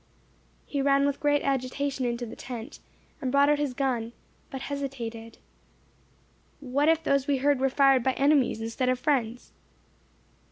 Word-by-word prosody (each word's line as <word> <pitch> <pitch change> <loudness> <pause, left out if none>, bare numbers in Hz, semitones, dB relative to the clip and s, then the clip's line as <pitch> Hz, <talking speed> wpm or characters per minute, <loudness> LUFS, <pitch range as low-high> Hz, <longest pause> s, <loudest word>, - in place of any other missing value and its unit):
He 280 - -2
ran 275 0 +3
with 285 -1 -1
great 290 -1 +2
agitation 270 0 -1
into 240 0 -2
the 225 - -9
tent, 245 +2 -8 0.4
and 255 - -2
brought 280 +1 +4
out 295 0 +2
his 285 -4 -2
gun, 240 -4 -1 0.4
but 265 - -6
hesitated. 240 -5 -6 1.2
"What 285 +2 +1
if 325 0 +2
those 275 -3 +1
we 280 -1 +2
heard 280 0 +2
were 270 +1 +2
fired 270 -1 +4
by 260 +2 +1
enemies, 275 -5 +2
instead 230 +3 -1
of 255 - +1
friends?" 250 -4 -1
270 Hz, 155 wpm, -27 LUFS, 250-285 Hz, 1.2 s, brought